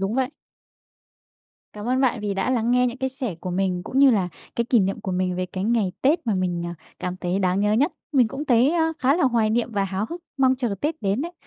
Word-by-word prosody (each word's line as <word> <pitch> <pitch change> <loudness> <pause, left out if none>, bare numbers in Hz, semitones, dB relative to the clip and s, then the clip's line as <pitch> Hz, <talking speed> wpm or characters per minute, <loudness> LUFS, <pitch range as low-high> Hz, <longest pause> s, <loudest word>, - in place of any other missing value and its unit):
đúng 195 +3 -1
vậy. 260 0 0 1.4
Cảm 210 +2 -6
ơn 255 +1 +2
bạn 255 -4 +2
vì 205 -1 -2
đã 195 +6 0
lắng 235 -2 +1
nghe 250 0 +4
những 245 +1 -4
cái 265 - -1
sẻ 260 -6 -4
của 185 - -4
mình 180 -1 -1
cũng 260 - -2
như 275 -1 +7
là 195 -6 +1 0.3
cái 235 - +1
kỷ 235 -1 +3
niệm 195 0 -1
của 190 - -4
mình 180 0 -1
về 185 0 -2
cái 185 +1 -4
ngày 220 -4 +1
Tết 280 +1 +2
mà 220 - +1
mình, 180 -2 -1
ờ, 170 - -5 0.2
cảm 180 0 -4
thấy 180 0 -1
đang 185 0 +1
nhớ 210 +1 +2
nhất. 280 +10 +2 0.2
Mình 250 -5 +4
cũng 270 +5 -5
thấy, 250 0 +4
ơ, 325 -1 +2
khá 270 +4 +3
là 350 - +2
hoài 230 -4 +2
niệm 235 +1 0
và 200 -2 +1
háo 195 +2 -2
hức, 345 +1 -5 0.2
mong 260 -1 +3
chờ 240 -5 -1
Tết 305 -3 -2
đến 200 +6 0
đấy. 340 +2 -5
225 Hz, 260 wpm, -23 LUFS, 195-260 Hz, 1.4 s, như